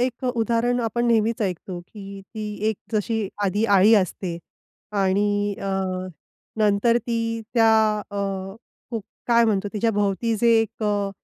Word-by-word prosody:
एक 255 +1 -1
अ, - - +1
उदाहरण 235 +2 +1
आपण 235 +1 0
नेहमीच 230 +1 +2
ऐकतो, 185 -1 -3
की 195 +2 -10
ती 210 -1 -4
एक 220 - -1 0.2
जशी 215 -1 0 0.2
आधी 205 +3 +1
अळी 205 +4 +6
असते 185 -3 0 0.6
आणि 205 +1 +1
अ, 195 - -3 0.9
नंतर 215 +2 +3
ती 230 -1 -2
त्या 225 -2 +5 0.4
अ, 205 - -6 0.7
खूप 225 -4 -3 0.2
काय 235 -1 +5
म्हणतो, 205 -2 +1
तिच्याभोवती 210 +1 0
जे 235 +3 +2
एक 225 0 -4
अ, 205 -1 0
215 Hz, 140 wpm, -23 LUFS, 200-230 Hz, 0.9 s, अळी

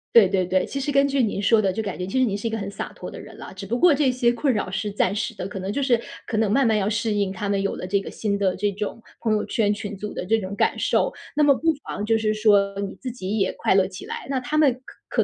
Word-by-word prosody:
对 225 -4 +8
对 185 -1 +1
对， 185 +1 +1
其 - - -6
实 275 +1 -1
根 275 0 +4
据 275 -2 +1
您 205 -2 -1
说 215 +2 +4
的， 195 -2 +1
就 220 - -2
感 200 -4 -4
觉 180 - -3
其 195 +8 -1
实 260 - +4
您 200 -4 -1
是 205 - -8
一 225 - 0
个 225 - -2
很 200 -2 -4
洒 200 - -6
脱 - - -8
的 - - -9
人 - - -11
啦， - - -9
只 190 +1 -8
不 235 +5 -2
过 340 -1 +6
这 275 -2 +3
些 250 -1 +2
困 260 +2 +1
扰 210 - -2
是 200 +3 -2
暂 200 0 +1
时 230 +3 -2
的。 185 - -4
可 195 - -7
能 190 +1 -3
就 280 - -1
是 255 -3 +3 0.3
可 230 - -3
能 215 -2 +2
慢 265 +2 +4
慢 220 -1 +3
要 200 0 +1
适 220 0 0
应 200 -2 0
她 200 +2 -4
们 200 -1 +1
有 195 - -2
了 - - -5
这 200 +1 +1
个 - - -8
新 205 -2 -1
的 195 -2 +1
这 205 +1 0
种 210 +3 -4 0.2
朋 220 -2 +1
友 210 - 0
圈、 210 -3 +1
群 205 0 -5
组 210 +2 -6
的 - - -4
这 225 +4 +3
种 190 -1 -5
感 - - +2
受。 - - +1 0.2
那 300 - +2
么 285 -1 +6
不 325 +4 +2
妨 205 - -4
就 225 +1 +3
是 215 -1 +1
说 205 -2 +3
你 200 -1 -4
自 255 - -5
己 215 -3 -4
也 190 - +1
快 - - +2
乐 190 -1 +4
起 185 -1 -9
来， - - -6
那 275 - 0
她 295 +5 -2
们 295 -4 +5
可 - - -2
210 Hz, 340 characters per minute, -24 LUFS, 200-240 Hz, 0.3 s, 对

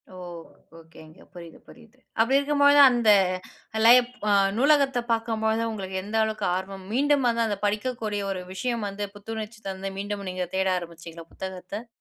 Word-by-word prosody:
ஓ! - - -11 0.6
ஓகேங்க. 160 -1 -16
புரியுது 170 -2 -11
புரியுது. 235 +1 -17 0.2
அப்டி 265 +4 +3
இருக்கும்பொழுது 285 0 +4
தான் 280 -2 +9
அந்த 235 -3 +3 0.7
லைப் 245 +1 +6 0.2
அ 205 - +4 0.2
நூலகத்த 275 -1 +3
பார்க்கும்போது 225 -1 0
உங்களுக்கு 190 -3 -5
எந்த 210 +3 -6
அளவுக்கு 220 0 -2
ஆர்வம் 190 0 -6
மீண்டும் 285 +1 +2
வந்து 230 -1 +1
அந்த 205 - -2
படிக்கக்கூடிய 210 -1 -2
ஒரு 185 -1 -4
விஷயம் 235 +1 -2
வந்து 200 +1 -4
புத்துணர்ச்சி 220 +1 -7
தந்து 195 0 -5
மீண்டும் 200 -1 -5
நீங்க 185 0 -3
தேட 190 0 +1
ஆரம்பிச்சீங்களா? 165 -1 -9
புத்தகத்த. 190 +4 -7
215 Hz, 150 wpm, -25 LUFS, 190-240 Hz, 0.7 s, தான்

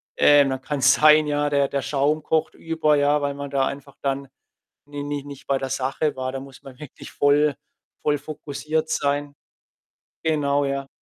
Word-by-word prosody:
Äh, 145 -1 +6
dann 130 -1 -2
kann's 135 -2 +3
sein, 155 0 +6
ja, 145 0 0
der 140 -1 +1
der 140 - -1
Schaum 145 +3 0
kocht 160 0 0
über, 160 -2 0
ja, 145 +1 +3
weil 140 0 -1
man 140 0 -6
da 135 -1 +1
einfach 140 0 -7
dann 140 0 -2 0.6
ni 145 0 -6
ni 145 -1 -4
nicht 140 -1 -11
bei 135 -1 +2
der 135 - -4
Sache 135 +3 -1
war. 130 0 -3
Da 135 - -4
muss 135 -1 -13
man 130 -1 -13
wirklich 150 -4 -11
voll 145 0 +3 0.5
voll 145 0 +2
fokussiert 155 +1 -4
sein. 145 -1 -1 0.9
Genau, 145 -3 +1
ja. 140 0 -3
145 Hz, 180 wpm, -23 LUFS, 140-150 Hz, 0.9 s, Äh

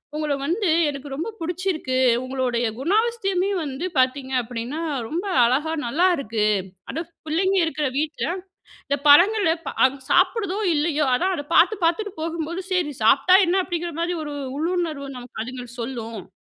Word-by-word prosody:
உங்கள 300 -1 -1
வந்து 360 +6 0 0.2
எனக்கு 280 0 -6
ரொம்ப 325 +11 -3
புடிச்சிருக்கு. 335 -5 -2 0.3
உங்களுடைய 255 -2 -1
குணாபஸ்தியமே 395 - +1
வந்து 280 +4 -4
பார்த்தீங்க 260 +1 +1
அப்டின்னா 240 +5 -5 0.3
ரொம்ப 345 - -3 0.2
அழகா 285 +6 +1
நல்லாருக்கு. 275 - +1 0.5
அது 325 - -3 0.3
பிள்ளைங்க 380 +5 +1
இருக்கிற 300 -2 -1
வீட்ல 310 +2 -1 0.6
இந்த 285 0 0
பழங்கள 355 +4 +6 0.3
அ - - +10 0.2
சாப்பிடுதோ 400 -4 +2 0.2
இல்லயோ 300 -1 +1
அதான் 370 +9 +1
அத 290 - -5
பார்த்து 410 +5 +5
பார்த்துட்டு 380 +4 +1
போகும்போது 335 +2 -3
சரி 350 -5 +1
சாப்பிட்டா 275 +10 +6
என்ன? 370 +2 +2
அப்டிங்கிற 345 -1 -3
மாரி 345 +1 0
ஒரு 295 -1 -6 0.2
உள்ளுணர்வு 325 -4 -2
நமக்கு 245 -3 -7
அதுங்கள் 245 -1 -8
சொல்லும்.'' 230 -5 -6
315 Hz, 135 wpm, -23 LUFS, 265-360 Hz, 0.6 s, அ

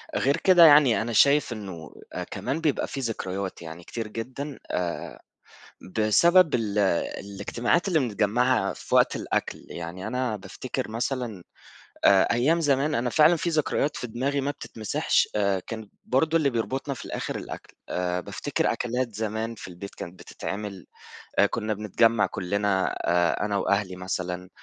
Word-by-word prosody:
غير 140 +2 +2
كده 175 -3 +7
يعني، 145 -7 +7
أنا 115 0 -3
شايف 140 +1 +4
إنه 95 -8 -8 0.4
كمان 155 +4 -3
بيبقى 150 -4 +1
في 135 - -5
ذكريات، 100 -6 -4
يعني 80 +1 -9
كتير 115 +2 -5
جدًا، 130 +6 -6
آآ، 90 -1 -3 0.8
بسبب 170 - +5
ال 105 -3 0 0.4
الاجتماعات 115 - -1
اللي 165 -4 +3
بنتجمَّعها 115 -1 +1
في - - -5
وقت - - +4
الأكل. - - -3
يعني، 85 +2 -6
أنا 125 -4 -1
بافتكر 100 - -5
مثلًا 115 -4 -3 0.6
آآ، 95 -1 +7
أيام 150 +8 +2
زمان 145 0 +2
أنا 120 +1 0
فعلًا 160 +4 +5
في 170 +2 -1
ذكريات 155 -1 0
في 125 - -4
دماغي 135 +5 -1
ما 140 +1 -1
بتتمسحش. 110 -6 0
آآ، 100 -2 +1
كان 110 -2 -6 0.2
برضه 160 +5 +2
اللي 140 -3 +2
بيربطنا 130 +4 -2
في - - -9
الآخر - - -4
الأكل. - - -8
آآ، 90 0 -1
بافتكر - - -1
أكلات 120 -1 -2
زمان 110 +1 -3
في 105 - -9
البيت، 95 +3 -9
كانت 90 +1 -8
بتتعمل 100 -2 -6 0.5
آآ، 100 - +7
كنَّا 110 0 -2
بنتجمَّع 105 +1 +2
كلَّنا 100 0 0
آآ، 85 +3 +2
أنا 100 -1 -1
وأهلي 100 -1 0
مثلًا. 90 0 -4
110 Hz, 150 wpm, -26 LUFS, 100-135 Hz, 0.8 s, كده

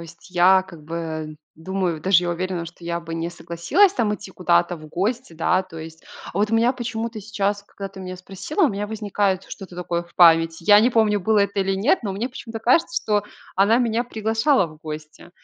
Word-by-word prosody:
есть 170 +3 -13
я, 185 +1 +5
как 170 -5 -14
бы, 160 -1 -5 0.2
думаю, 175 -1 -2
даже 180 +1 +4
я 175 - -1
уверена, 180 0 -3
что 170 +1 -12
я 170 0 -2
бы 165 -1 -9
не 165 +1 -2
согласилась 175 - +2
там 215 - 0
идти 205 -2 -10
куда-то 175 -1 +1
в 155 -1 -12
гости, 215 +6 -2
да. 180 +3 +1
То 185 -3 -11
есть, 160 0 -10 0.3
а 180 - -3
вот 210 +1 +1
у - - +1
меня 235 +2 +3
почему-то 230 -2 -4
сейчас, 200 -1 -2
когда 200 -1 -8
ты 195 0 -14
меня 185 0 -6
спросила, 195 - -4
у - - +6
меня 205 +1 -3
возникает 205 -3 -1
что-то 190 -3 -9
такое 175 -1 -2
в 175 - -24
памяти. 165 -1 +5
Я 205 -1 +8
не 240 +4 +3
помню, 220 -3 +3
было 215 +3 +3
это 200 +1 0
или 195 0 0
нет, 240 - +2
но 195 - -2
мне 220 +6 -3
почему-то 230 -3 -8
кажется, 330 +8 +2
что 210 -1 +1 0.3
она 205 +5 +4
меня 235 -1 0
приглашала 225 - +1
в 155 - -14
гости. 155 +2 -9
190 Hz, 215 wpm, -22 LUFS, 170-220 Hz, 0.3 s, Я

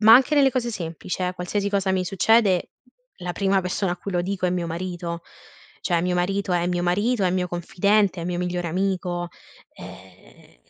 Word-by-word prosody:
ma 220 +1 +9
anche 265 +4 +5
nelle 275 -2 +5
cose 240 -2 -1
semplici, 175 -1 -5
eh, 180 0 0
qualsiasi 200 +3 -2
cosa 195 -1 +1
mi 185 -1 +1
succede, 195 0 +3 0.5
la 175 0 -4
prima 195 +1 +2
persona 180 0 -1
a - - -4
cui 200 - -6
lo 175 0 +1
dico 185 0 -1
è - - +1
mio 175 -1 -1
marito. 170 0 -4 0.6
Cioè, 170 -2 +1
mio 180 0 0
marito 190 +2 0
è 175 0 +1
mio 175 -1 0
marito, 205 +6 +1
è 180 - +3
mio 180 0 0
confidente, 200 +2 +1
è - - -4
mio 175 0 -2
migliore 180 -1 -2
amico, 180 -1 -1 0.5
ehm, - - -14
180 Hz, 190 wpm, -24 LUFS, 175-200 Hz, 0.6 s, ma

